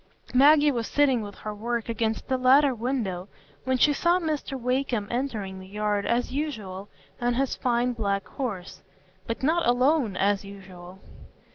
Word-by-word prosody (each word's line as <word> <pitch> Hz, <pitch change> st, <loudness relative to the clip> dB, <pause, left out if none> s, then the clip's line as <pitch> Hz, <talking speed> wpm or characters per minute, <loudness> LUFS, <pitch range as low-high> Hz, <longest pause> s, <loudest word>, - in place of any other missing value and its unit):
Maggie 290 Hz, +3 st, +6 dB
was 235 Hz, -4 st, -2 dB
sitting 270 Hz, -5 st, +2 dB
with 205 Hz, -1 st, -8 dB
her 215 Hz, -, -6 dB
work 235 Hz, +2 st, -3 dB
against 225 Hz, -1 st, -2 dB
the 260 Hz, -1 st, 0 dB
latter 265 Hz, +2 st, +5 dB
window 220 Hz, -7 st, -3 dB, 0.4 s
when 260 Hz, 0 st, +1 dB
she 290 Hz, +3 st, +4 dB
saw 345 Hz, +5 st, +2 dB
Mr 305 Hz, -5 st, -3 dB
Wakem 250 Hz, -3 st, -1 dB
entering 220 Hz, -7 st, -3 dB
the 185 Hz, -, -11 dB
yard, 210 Hz, 0 st, -1 dB
as 240 Hz, +1 st, 0 dB
usual, 210 Hz, -10 st, -4 dB, 0.3 s
on 240 Hz, 0 st, +1 dB
his 270 Hz, +1 st, 0 dB
fine 245 Hz, 0 st, 0 dB
black 200 Hz, -4 st, -2 dB
horse; 205 Hz, -10 st, -5 dB, 0.5 s
but 230 Hz, +3 st, -4 dB
not 330 Hz, +2 st, +2 dB
alone, 250 Hz, -3 st, +2 dB
as 200 Hz, +1 st, +1 dB
usual. 190 Hz, -2 st, -11 dB
240 Hz, 155 wpm, -26 LUFS, 205-270 Hz, 0.5 s, Maggie